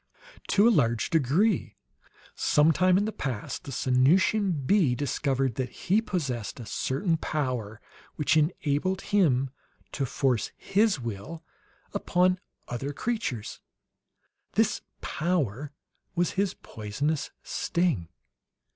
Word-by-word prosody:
"To 205 +3 +5
a - - +6
large 120 - +2
degree. 165 - +2 0.6
Some 150 +2 +4
time 185 +3 +4
in 205 - +2
the 220 - -2
past 125 - -4
the 140 - -6
Sanusian 155 - +2
bee 170 -8 +3
discovered 135 -1 0
that 125 - -3
he 200 +5 +1
possessed 135 - -3
a 120 - -7
certain 160 - 0
power 125 -9 -2 0.4
which 150 +1 +2
enabled 155 +3 +1
him 135 -10 +3 0.4
to 135 -3 -2
force 125 -3 0
his 200 -4 +2
will 120 +8 -6 0.5
upon 180 +1 +2 0.3
other 135 +4 -4
creatures. 215 - -3 0.9
This - - +2 0.2
power 150 - -1 0.4
was 175 0 +1
his 195 0 0
poisonous 140 +9 -3
sting. 160 - 0
150 Hz, 110 wpm, -27 LUFS, 125-185 Hz, 0.9 s, a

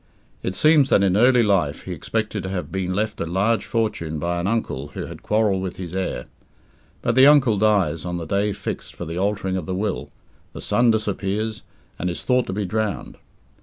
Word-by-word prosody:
It 95 - -3
seems 155 -3 +5
that 100 - +4
in 95 -1 +3
early 125 +2 +5
life 90 -9 +1
he - - -7
expected 110 -2 -2
to 95 - -5
have 95 -2 -4
been 95 -1 -2
left 105 +3 -2
a 85 - -2
large 100 +7 +1
fortune 105 -9 -1
by 85 +3 -1
an 85 - -1
uncle 100 - -2
who - - -4
had - - -9
quarrelled 105 -3 +1
with 95 -2 -4
his 90 -2 -7
heir. 95 0 -2 0.8
But 115 - +2
the 130 +3 +7
uncle 135 -8 +5
dies 100 -6 +2
on 90 0 -3
the 85 - -5
day 100 +4 0
fixed 100 -1 -6
for 85 - -6
the 85 +2 -4
altering 100 -1 0
of 85 -4 -5
the 95 - -2
will, 100 +1 -2 0.4
the - - -8
son 120 0 +2
disappears, 105 0 -1 0.4
and 90 - -1
is 85 - -5
thought 125 -1 +2
to 95 - -3
be 105 +1 -2
drowned. 105 +2 -3
100 Hz, 205 wpm, -22 LUFS, 90-110 Hz, 0.8 s, the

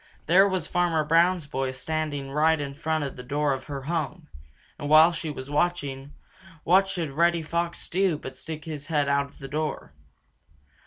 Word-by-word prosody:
There 190 +5 +5
was 185 -4 -1
Farmer 175 -3 +1
Brown's 165 +2 +3
boy 135 -2 -2
standing 145 0 -3
right 155 +2 +3
in 140 -1 -4
front 155 +1 -1
of 140 - -5
the - - -6
door 145 +2 0
of 130 - -6
her 140 -2 -6
home. 165 +1 -3 0.5
And 145 - -4
while 155 +2 +8
she 165 -1 -4
was 140 -1 -7
watching, 145 -4 -1 0.5
what 190 +3 +4
should 175 -6 -3
Reddy 170 +3 +2
Fox 170 +2 -2
do 185 -3 +1
but 130 -3 -8
stick 155 +2 -7
his 150 -3 -6
head 150 -3 +1
out 140 0 +1
the 135 - -9
door. 155 +2 -3
155 Hz, 175 wpm, -26 LUFS, 140-170 Hz, 0.5 s, while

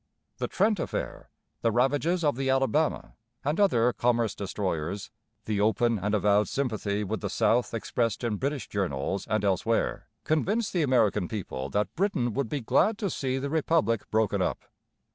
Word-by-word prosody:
The - - -1
Trent 210 0 +1
affair, - - -4 0.3
the 115 - +2
ravages 145 +9 +1
of 145 -4 +2
the 135 +1 -1
Alabama 135 +4 +1 0.3
and 150 +5 0
other 125 - +3
commerce 120 -3 +1
destroyers, 95 -1 -3 0.3
the 105 -2 0
open 110 +2 +2
and 105 +3 0
avowed 105 0 +3
sympathy 110 -6 -1
with 100 - -3
the - - -2
South 120 +1 +2
expressed 115 0 -1
in 115 -3 -1
British 140 +2 -2
journals 95 -1 -2
and 110 0 0
elsewhere, 100 +4 0 0.2
convinced 200 +8 0
the 175 - +2
American 115 - +2
people 70 -11 -5
that 100 +7 -1
Britain 165 - 0
would 135 -2 -1
be 145 - -2
glad 210 - +2
to 200 -5 -2
see 130 -1 -1
the 140 +1 -3
Republic 155 -8 +1
broken 110 -1 +1
up. - - -2
120 Hz, 160 wpm, -28 LUFS, 105-145 Hz, 0.3 s, other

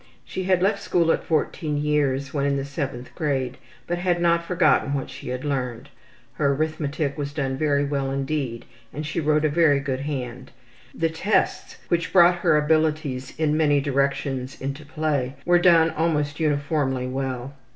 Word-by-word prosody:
She 185 - -4
had 185 -1 +2
left 200 +1 +2
school 165 -2 +2
at - - 0
14 155 -1 -1
years 140 -2 0
when 140 -1 0
in 140 0 +1
the 135 - -2
7th 140 -3 -5
grade, 130 -4 -2 0.3
but 175 0 -2
had 175 -1 +1
not 170 0 +2
forgotten 170 -5 +2
what 135 - -4
she - - -8
had 125 +2 -4
learned. 130 -2 -3 0.4
Her 140 +1 +1
arithmetic 155 -1 -2
was 145 0 -3
done 135 -3 -1
very 145 0 +1
well 140 -1 -1
indeed 135 -3 -2 0.3
and 150 +1 -5
she 155 +3 -2
wrote 155 0 +2
a - - +3
very 150 -2 +4
good 135 -2 -3
hand. 130 -4 -5 0.5
The 165 0 +1
tests, 175 +6 0
which 170 -1 0
brought 175 -1 +6
her 155 - +3
abilities 150 -4 0
in 155 -1 +1
many 150 -2 +3
directions 140 -1 -1
into 140 +2 -5
play, 145 -4 -1
were 175 0 +5
done 165 -2 +5
almost 150 -2 -1
uniformly 145 -4 0
well. 130 0 -4
145 Hz, 170 wpm, -24 LUFS, 135-160 Hz, 0.5 s, brought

